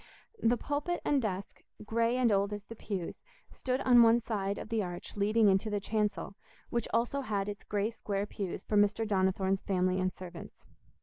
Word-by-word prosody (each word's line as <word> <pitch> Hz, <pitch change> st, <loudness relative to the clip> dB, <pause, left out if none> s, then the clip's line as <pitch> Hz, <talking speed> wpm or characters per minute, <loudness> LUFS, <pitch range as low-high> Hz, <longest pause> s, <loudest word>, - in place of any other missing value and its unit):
The 235 Hz, +2 st, +3 dB
pulpit 295 Hz, +7 st, -2 dB
and 285 Hz, -2 st, +3 dB
desk, 195 Hz, -3 st, -4 dB, 0.2 s
grey 230 Hz, +3 st, +1 dB
and 245 Hz, -3 st, +3 dB
old 200 Hz, +1 st, +2 dB
as 205 Hz, 0 st, -6 dB
the 230 Hz, -, -9 dB
pews, 195 Hz, -5 st, -5 dB, 0.3 s
stood 255 Hz, +1 st, -2 dB
on 245 Hz, -2 st, +7 dB
one 230 Hz, 0 st, +6 dB
side 205 Hz, -4 st, -2 dB
of -, -, -7 dB
the 225 Hz, -2 st, +1 dB
arch 175 Hz, -2 st, -6 dB
leading 210 Hz, +2 st, +3 dB
into 195 Hz, +3 st, +3 dB
the 205 Hz, -1 st, 0 dB
chancel, 210 Hz, -1 st, -1 dB, 0.4 s
which 235 Hz, -, 0 dB
also 240 Hz, +5 st, +1 dB
had 205 Hz, -6 st, -2 dB
its 205 Hz, 0 st, -6 dB
grey 210 Hz, +2 st, -1 dB
square 205 Hz, -3 st, -3 dB
pews 200 Hz, -3 st, -5 dB
for 210 Hz, -, 0 dB
Mr. 205 Hz, +2 st, +3 dB
Donnithorne's 190 Hz, -1 st, +1 dB
family 185 Hz, -1 st, +1 dB
and 185 Hz, 0 st, +1 dB
servants. 175 Hz, -2 st, -10 dB
210 Hz, 185 wpm, -31 LUFS, 195-230 Hz, 0.4 s, on